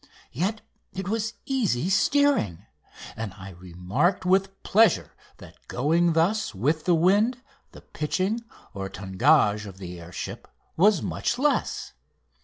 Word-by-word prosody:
Yet 195 - -2 0.3
it 190 -1 -5
was 220 +2 -2
easy 210 - 0
steering, 275 - +2 0.5
and 110 -3 -5
I 95 -1 -10
remarked 90 - -1
with 195 +1 +1
pleasure 215 -2 +3 0.3
that - - -16
going 165 +6 +2
thus 170 - +1
with 150 +10 0
the 175 - +4
wind 205 +9 +3 0.3
the - - -13
pitching 190 +9 -2 0.3
or 95 -1 -5
tangage 105 - +2
of 95 -2 -10
the 90 -2 -8
air 85 +1 -11
ship - - -7 0.3
was 195 0 +4
much 240 - -2
less. 290 +2 0
165 Hz, 130 wpm, -25 LUFS, -, 0.5 s, the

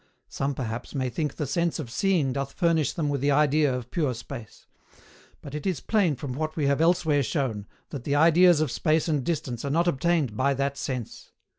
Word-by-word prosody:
Some, 135 0 -2
perhaps, 120 0 -5
may 130 -2 -1
think 150 +3 -2
the 150 - -2
sense 170 +4 0
of 130 -7 -6
seeing 175 - +1
doth 140 0 -3
furnish 165 -4 +1
them 155 -3 -2
with 140 -2 -1
the 140 - +2
idea 150 0 +3
of 125 -1 -5
pure 145 -8 0
space; 115 -1 -10 0.8
but 140 - -10
it 150 +5 -4
is 180 -7 -1
plain 195 -9 +1
from 130 0 -5
what 155 +3 -3
we 150 - 0
have 140 +2 +2
elsewhere 160 -3 +3
shown, 120 -6 -2 0.2
that 135 -4 -6
the 140 - 0
ideas 170 +2 +5
of 155 -5 0
space 155 +3 +1
and 150 -5 0
distance 130 -7 -3
are 140 - -2
not 170 +5 +2
obtained 160 -6 +1
by 140 +4 +1
that 140 +1 -1
sense. 130 -4 -6
145 Hz, 205 wpm, -26 LUFS, 130-160 Hz, 0.8 s, ideas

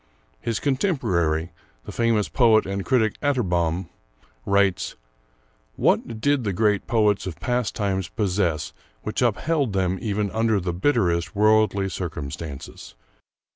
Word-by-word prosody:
His 115 -2 -2
contemporary, 90 - 0 0.3
the - - -7
famous 115 -1 +1
poet 115 -4 +4
and 100 0 -3
critic 110 -3 +1
Atterbom, 90 - 0 0.6
writes: 100 -2 +1 0.8
"What 115 -2 +1
did 145 +2 +1
the 100 -3 -1
great 105 0 +1
poets 105 -4 +2
of 85 - -6
past 125 -2 -1
times 95 -4 -1
possess 90 -6 -1 0.3
which - - -3
upheld 145 -8 +1
them 95 -1 0 0.3
under 110 0 +2
even - - -1
the 90 -1 -2
bitterest 90 -5 +1
worldly 105 -1 +3
circumstances? 80 -5 -6
100 Hz, 120 wpm, -24 LUFS, 90-115 Hz, 0.8 s, poet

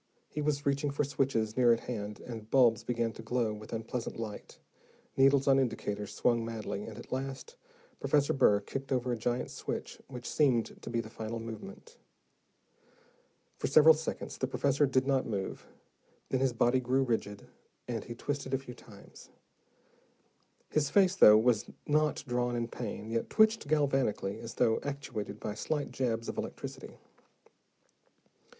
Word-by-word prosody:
He 150 - -3
was 145 -1 -1
reaching 140 +1 +1
for 140 +1 0
switches 130 -6 0
near 125 -2 +5
at 115 - +2
hand, 105 -3 -5
and 110 -3 -8
bulbs 120 -4 +4
began 120 -2 -1
to - - -9
glow 115 -1 0
with 105 0 -10
unpleasant 115 +1 -4
light, 110 -2 -7 0.6
needles 135 0 +4
on 135 0 +6
indicators 105 -5 -2
swung 120 -2 +2
madly, 110 -3 -4
and 110 -2 -9
at 120 - -11
last, 135 - -4 0.4
Professor 145 -1 +2
Burr 105 -6 +4
kicked 135 +6 -6
over 125 -1 0
a - - +1
giant 120 +2 -2
switch, - - -5
which 125 -2 -8
seemed 130 -7 +1
to - - -7
be 115 -1 0
the 110 -1 -11
final 115 +1 -5
movement. 115 -1 -9 1.6
For - - 0
several 155 +3 +8
seconds 160 +1 -5
the 130 - 0
professor 140 +2 +2
did 130 0 +2
not 135 -1 +1
move. 100 -4 -4 0.6
Then 130 - +1
his 135 -1 +2
body 120 +2 +3
grew 130 +2 +1
rigid, 110 -5 -2 0.4
and 115 -4 -3
he 120 - -8
twisted 135 +1 -2
a - - +2
few 130 -2 -9
times. 105 -4 -15 1.4
His 150 -2 +1
face, 190 +3 +4
though 105 - +8 0.5
not 150 0 +1
drawn 120 0 0
in 120 0 -2
pain, 110 -2 -6
yet 115 0 -1
twitched 220 -5 +3
galvanically, 135 -9 +1
as 115 0 -8
though 115 -2 +3
actuated 125 -8 -5
by 105 - -4
slight 145 +6 -2
jabs 115 -3 -1
of - - -4
electricity. - - -7
125 Hz, 155 wpm, -31 LUFS, 115-135 Hz, 1.6 s, several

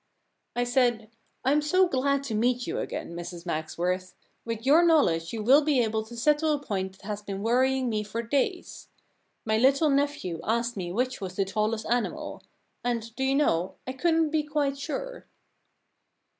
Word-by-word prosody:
* - - -51
I 245 - +1
said; 240 -3 +1 0.3
Fm 290 +3 +4
so 370 +5 +3
glad 280 -1 +1
to 260 -5 -4
meet 245 +3 +1
you - - -3
again, - - -5
n - - -8
The 170 - -4
Problem - - -8
Club 175 -1 -8
Mrs - - -30
Magsworth. 175 +3 -2 0.3
With 230 0 -4
your 300 +5 +6
knowledge 180 - +3
you 225 -2 -4
will 270 +7 +6
be 295 -3 +2
able 220 -1 0
to 235 +1 -10
settle 300 +5 +2
a 295 - -1
point 190 -8 -3
that 190 - -21
has 210 0 -4
been 200 -1 -5
worrying 260 +3 +2
me 215 -2 0
for 215 +3 -4
days. 280 - -2 0.6
My 220 0 +2
little 275 +5 +4
nephew 275 - 0
asked 235 +2 0
me 180 -3 -4
which 250 +4 -1
was 185 -2 -5
the 195 - +1
tallest 215 +3 -1
animal. 240 +1 -2 0.4
And, 230 -2 -2
do 265 - -2
you 270 +1 +2
know, 185 - +1
I 255 - -4
couldn't 325 +2 +2
be 310 -1 +2
quite 295 -2 -1
sure." - - -5
240 Hz, 195 wpm, -27 LUFS, 210-280 Hz, 0.6 s, your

